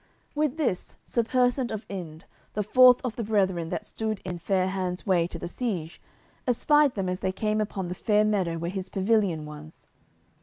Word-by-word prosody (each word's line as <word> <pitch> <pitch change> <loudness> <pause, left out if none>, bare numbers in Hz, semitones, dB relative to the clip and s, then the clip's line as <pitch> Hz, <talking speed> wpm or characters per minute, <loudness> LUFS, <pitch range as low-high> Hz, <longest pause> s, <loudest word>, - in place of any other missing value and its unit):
With 300 -1 0
this 250 - -1
Sir 235 - +1
Persant 250 +1 +1
of 220 -1 -5
Inde, 170 -4 -7 0.3
the 210 - 0
fourth 250 +4 +7
of 245 -3 -3
the 235 - -2
brethren 190 -6 +1
that 210 - -3
stood 220 -1 -3
in 180 -2 -4
Fair 185 +2 +1
hands' 185 -1 -3
way 175 -4 +3
to 175 - -7
the - - -5
siege, 180 -6 -4 0.5
espied 290 +3 +4
them 195 -3 -1
as 180 0 -2
they 190 -1 -1
came 215 +2 0
upon 195 -3 -3
the 180 - -3
fair 210 +3 +2
meadow 190 -6 0
where 170 +1 -3
his 190 -1 -5
pavilion 195 -6 +1
was. 150 +1 -11
195 Hz, 190 wpm, -27 LUFS, 180-225 Hz, 0.5 s, fourth